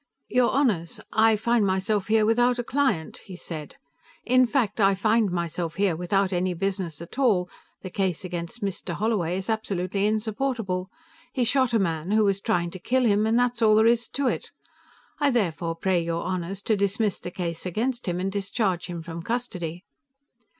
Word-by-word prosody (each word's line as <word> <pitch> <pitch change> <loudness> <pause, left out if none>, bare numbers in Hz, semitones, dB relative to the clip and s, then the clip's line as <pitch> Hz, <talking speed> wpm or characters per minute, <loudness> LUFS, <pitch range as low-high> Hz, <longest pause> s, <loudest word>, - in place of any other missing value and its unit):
"Your 250 -1 +3
Honors, 215 - 0
I 220 0 +5
find 235 +1 +2
myself 195 +1 0
here 220 -1 +4
without 240 +2 +3
a 245 - -1
client," 235 - 0
he 185 - -9
said. 160 -4 -7 0.5
"In 255 +1 +4
fact, 230 -5 0
I 195 0 +5
find 215 +2 +2
myself 170 -1 -3
here 195 -4 +1
without 190 +3 0
any 180 0 0
business 185 -4 -3
at 170 - -10
all; 205 -9 +3 0.3
the 185 - -7
case 190 -1 -1
against 180 +6 -5
Mr. 185 -3 -3
Holloway 195 -6 0
is 190 - -5
absolutely 200 -3 -1
insupportable. 215 -3 -1 0.4
He 255 - +1
shot 255 +1 +2
a 230 - +3
man 165 -4 -1
who 215 +1 +4
was 200 -1 +1
trying 175 -2 0
to 185 - -8
kill 255 +7 +1
him, 210 0 +3
and 225 +1 +2
that's 245 -1 +1
all 215 -1 +6
there 220 +1 +5
is 235 0 +3
to 280 - -1
it. 250 - -1 0.7
I 290 -1 +3
therefore 175 - 0
pray 180 +1 +1
your 165 0 -2
Honors 185 +2 -3
to 220 - +2
dismiss 200 0 0
the - - -6
case 170 -1 -4
against 235 +7 -2
him 175 0 -1
and 190 +1 -1
discharge 195 -2 -1
him 170 -2 -6
from 165 0 -6
custody." 180 -6 -3
200 Hz, 185 wpm, -25 LUFS, 180-230 Hz, 0.7 s, all